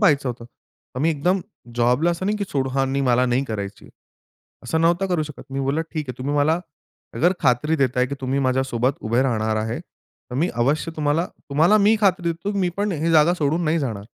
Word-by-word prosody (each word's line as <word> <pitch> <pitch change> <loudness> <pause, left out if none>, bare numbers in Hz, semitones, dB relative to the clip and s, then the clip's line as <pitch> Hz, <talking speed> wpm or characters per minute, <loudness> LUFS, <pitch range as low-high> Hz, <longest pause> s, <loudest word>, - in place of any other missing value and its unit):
पाहायचं 145 - +3
होतं. 120 -1 -6
तर 120 +1 -15
मी 160 +3 +3
एकदम 175 +6 +1 0.3
जॉबला 125 +8 +2
असं 170 +2 -3
नाही 210 +1 +1
की 205 - -1
सोडू, 135 -2 -1
"हां, 135 0 +1
नाही, 140 - 0
मला 125 0 +3
नाही 125 +2 +1
करायची." 100 -5 -6 0.8
असं 160 +6 0
नव्हतं 175 +3 +2
करू 175 -4 0
शकत. 150 -2 -8
मी 135 0 -2
बोललं 140 +4 0
"ठीक 155 -4 -4
आहे 125 0 -6
तुम्ही 140 +3 -2
मला 155 +4 +2 0.5
अगर 175 +3 +3
खात्री 140 +4 +2
देताय 130 -3 +1
की 140 - -4
तुम्ही 135 +1 -1
माझ्यासोबत 130 -1 +1
उभे 115 +4 +1
राहणार 110 -4 0
आहे. 110 +2 -2
तर 125 -7 -17
मी 170 +5 +1
अवश्य 145 +7 0
तुम्हाला, 155 +3 +1 0.2
तुम्हाला 160 +9 +4
मी 210 +2 +4
खात्री 180 -4 +2
देतो 170 +5 -4
मी 185 -2 +2
पण 205 0 0
ही 165 +1 -1
जागा 160 +3 +5
सोडून 160 +1 0
नाही 160 +1 +1
जाणार." 110 -8 -3
145 Hz, 205 wpm, -22 LUFS, 125-165 Hz, 0.8 s, जागा